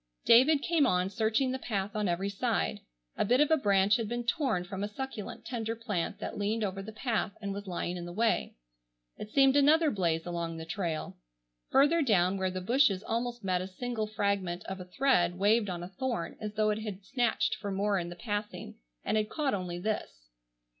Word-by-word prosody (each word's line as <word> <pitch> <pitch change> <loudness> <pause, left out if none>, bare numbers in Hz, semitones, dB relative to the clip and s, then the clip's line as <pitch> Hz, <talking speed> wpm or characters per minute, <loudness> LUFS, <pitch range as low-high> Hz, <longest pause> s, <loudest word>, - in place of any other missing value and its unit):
David 275 +5 +6
came 325 -5 +3
on 180 -2 +1
searching 225 +4 +1
the 260 - -3
path 205 -3 -3
on 210 -1 0
every 180 +3 0
side. 80 - -1 0.4
A - - +2
bit 245 +5 +3
of 295 +1 +4
a - - +7
branch 200 -5 +3
had 225 -3 -3
been 240 0 -3
torn 235 - 0
from 195 +2 -5
a - - 0
succulent, 215 -1 -6
tender 225 -2 -3
plant 210 -7 -3
that - - -5
leaned 215 +2 0
over 195 -1 -2
the 210 +3 -8
path 220 -2 -1
and 200 -2 -4
was 200 0 -7
lying 180 0 -3
in 175 - -6
the 175 - -7
way. 225 +5 0 0.6
It 210 - -7
seemed 270 +2 +4
another 300 +2 +5
blaze 170 -5 0
along 170 -1 -3
the 160 - -6
trail. 165 - -3 0.5
Further 290 +5 +4
down 195 - +3
where 190 0 +1
the 185 0 -4
bushes 215 -2 +3
almost 240 0 -3
met 185 -2 +1
a 185 - -4
single 220 +3 -3
fragment 200 -4 -1
of 190 0 -5
a 180 - -7
thread 180 -5 +2
waved 205 +2 +3
on 175 -1 -4
a 175 - -7
thorn 230 -1 -3
as 210 -1 -5
though 215 -1 +2
it 210 - -2
had 205 -3 -6
snatched 245 -1 +1
for 205 - -5
more 200 0 +1
in 170 -1 -4
the 175 - -8
passing 205 +2 -5 0.3
and 215 - +1
had 215 0 0
caught 295 -4 -1
only 180 -3 -3
this. - - -4
205 Hz, 210 wpm, -30 LUFS, 185-235 Hz, 0.6 s, a